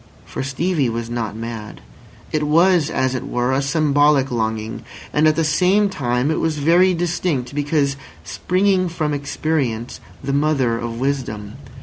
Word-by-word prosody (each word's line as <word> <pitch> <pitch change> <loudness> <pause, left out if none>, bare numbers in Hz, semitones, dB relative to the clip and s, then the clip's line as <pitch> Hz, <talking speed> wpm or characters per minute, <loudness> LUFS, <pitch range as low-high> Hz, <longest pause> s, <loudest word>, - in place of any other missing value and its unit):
For - - -5
Stevie 140 +1 0
was 115 0 -4
not 115 -3 -3
mad. 115 -2 -7 0.5
It 155 - 0
was, 170 0 +4
as 130 0 0
it 130 - -3
were, 125 +1 0
a 135 +1 +1
symbolic 145 -2 +2
longing; 110 -1 -2 0.3
and 150 +1 +4
at 155 - +3
the 165 - +1
same 185 +6 +3
time 125 -5 0
it - - 0
was 160 -2 -1
very 175 +5 +4
distinct, 165 -6 -1
because 145 -1 0 0.3
springing 185 0 +1
from 155 -3 -2
experience, 140 -5 -2 0.2
the 140 +1 -2
mother 140 -5 +1
of 115 0 -5
wisdom. 125 -7 -3
140 Hz, 150 wpm, -20 LUFS, 120-160 Hz, 0.5 s, was